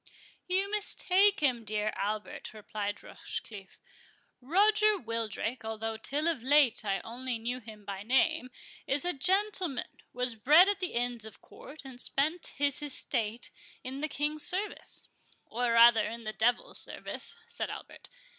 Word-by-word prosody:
"You 385 +2 +1
mistake 405 -2 +2
him, 250 -5 +1
dear 215 0 -1
Albert," 210 +1 -4
replied 205 -1 -5
Rochecliffe—"Roger 390 - -1
Wildrake, 230 - -3
although 220 0 -3
till 285 +8 -2
of 325 -8 0
late 270 -2 +4
I 195 -2 -1
only 245 +1 -4
knew 240 +3 -3
him 215 -3 -12
by 195 -1 -5
name, 250 +2 +2 0.4
is 275 +4 +1
a 355 - 0
gentleman, 370 -2 0
was 250 0 -1
bred 300 - +6
at 405 -1 0
the 365 -2 -3
Inns 240 -1 -2
of 220 -1 -10
Court, 290 0 -13
and 255 -2 -8
spent 315 +5 -1
his 285 0 +1
estate 240 -5 -1 0.3
in 260 +2 -6
the 310 - -1
King's 295 +1 -1
service." 400 +3 +1 0.4
"Or 240 +1 -1
rather 230 -1 +7
in 230 0 -7
the 215 0 -4
devil's 240 +3 +1
service," - - -3
said 470 - -3
Albert. - - -9
250 Hz, 145 wpm, -30 LUFS, 225-315 Hz, 0.4 s, rather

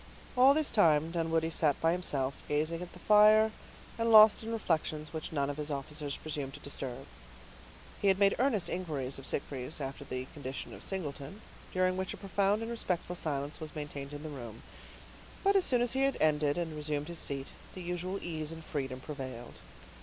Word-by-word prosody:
All 260 +3 +7
this 310 -1 +1
time 160 -5 +4
Dunwoodie 165 -1 0
sat 150 -4 +2
by 165 - +3
himself, 140 -7 0
gazing 155 +3 0
at 180 - -7
the - - -11
fire, 215 +1 +6 0.5
and 230 0 +2
lost 215 -1 +9
in 225 0 -5
reflections 155 -7 -1
which 160 -1 -5
none 140 -3 0
of 145 0 -4
his 150 0 -3
officers 145 0 -4
presumed 145 -3 -5
to - - -10
disturb. 135 -3 -4 1.0
He 200 - +2
had 190 -1 +5
made 200 0 +4
earnest 230 -9 +2
inquiries 150 -8 -3
of 135 - -6
Sitgreaves 135 +1 -3
after 140 0 -5
the 130 -1 -4
condition 135 -3 -6
of - - -10
Singleton, 160 0 -4 0.3
during 185 0 +1
which 190 0 -3
a - - -14
profound 200 +2 +1
and 230 - -4
respectful 180 -6 -2
silence 145 -3 -3
was 155 -2 -6
maintained 145 -2 -5
in 145 0 -7
the 155 - -5
room; 120 -6 -8 0.8
but 395 0 +4
as 385 - +5
soon 245 -2 +3
as 245 - +2
he 265 - +1
had 275 0 +2
ended, 150 -1 +2
and 165 -3 -2
resumed 150 -1 -2
his 170 -1 -4
seat, 135 -1 -2 0.3
the 185 - -6
usual 180 +2 -3
ease 160 -2 -3
and 160 -1 -9
freedom 130 -3 -4
prevailed. 130 -5 -7
160 Hz, 190 wpm, -32 LUFS, 145-190 Hz, 1.0 s, lost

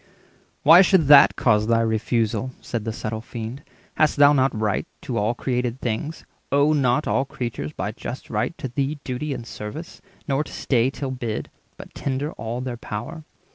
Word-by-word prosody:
"Why 165 +5 +9
should 190 -4 +4
that 145 -1 +8
Cause 105 -3 +2
thy 115 0 +3
refusal?" 115 +2 0
said 115 -3 -4
the 115 - -1
subtle 110 0 -4
Fiend. 115 +3 -7 0.4
"Hast 155 -1 +3
thou 145 0 +7
not 130 -5 +2
right 105 -2 0 0.2
to - - -2
all 110 +3 0
created 125 -1 -2
things? 125 +7 -3 0.3
Owe 145 +2 +4
not 140 0 +2
all 135 - +2
creatures, 120 - -5
by - - -4
just - - -7
right, - - -1
to - - -4
thee 140 +4 -2
Duty 130 +4 -3
and 125 -4 -5
service, 115 +10 -8 0.3
nor 140 +1 +1
to - - -12
stay 125 -1 +1
till 135 -1 -5
bid, 120 -4 -4 0.3
But - - -11
tender 140 +2 -2
all 115 +3 -5
their 125 -2 -4
power? 120 +9 -6
125 Hz, 175 wpm, -23 LUFS, 115-140 Hz, 0.4 s, Why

